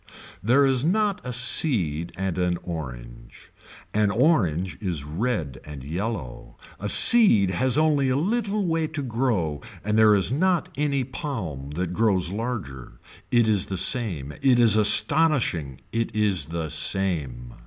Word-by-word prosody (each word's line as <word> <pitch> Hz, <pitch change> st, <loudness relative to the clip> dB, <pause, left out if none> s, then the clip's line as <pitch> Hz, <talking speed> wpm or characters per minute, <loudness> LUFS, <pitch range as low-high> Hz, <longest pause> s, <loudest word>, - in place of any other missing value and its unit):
There 125 Hz, +8 st, +2 dB
is 130 Hz, -2 st, +1 dB
not 205 Hz, +4 st, -1 dB
a 125 Hz, -, -6 dB
seed 115 Hz, -, +2 dB
and 95 Hz, -2 st, -4 dB
an 90 Hz, -1 st, -1 dB
orange. 60 Hz, -8 st, -10 dB, 0.4 s
An 105 Hz, -1 st, +1 dB
orange 95 Hz, -, 0 dB
is 85 Hz, -8 st, -3 dB
red 80 Hz, -, -4 dB
and 75 Hz, -3 st, -10 dB
yellow. 85 Hz, -, -6 dB, 0.2 s
A 105 Hz, -, -5 dB
seed 115 Hz, -, +6 dB
has 130 Hz, +7 st, 0 dB
only 150 Hz, -3 st, +1 dB
a 130 Hz, -, 0 dB
little 205 Hz, -, -2 dB
way 165 Hz, -2 st, -1 dB
to 155 Hz, -2 st, -6 dB
grow 115 Hz, -, -2 dB, 0.2 s
and 105 Hz, +2 st, -1 dB
there 110 Hz, -1 st, +5 dB
is 100 Hz, +3 st, +1 dB
not 175 Hz, +4 st, 0 dB
any 140 Hz, -2 st, -1 dB
palm 115 Hz, -, -7 dB
that 90 Hz, 0 st, -4 dB
grows 95 Hz, -4 st, 0 dB
larger. 100 Hz, -, -6 dB, 0.4 s
It 120 Hz, -2 st, +2 dB
is 105 Hz, -3 st, 0 dB
the 95 Hz, -, -5 dB
same. 90 Hz, -, 0 dB
It 130 Hz, -3 st, +3 dB
is 115 Hz, -3 st, +5 dB
astonishing, 110 Hz, -, +3 dB
it 115 Hz, -1 st, -3 dB
is 105 Hz, -4 st, 0 dB
the 80 Hz, -1 st, -6 dB
same. 70 Hz, -11 st, -1 dB
105 Hz, 145 wpm, -23 LUFS, 85-135 Hz, 0.4 s, seed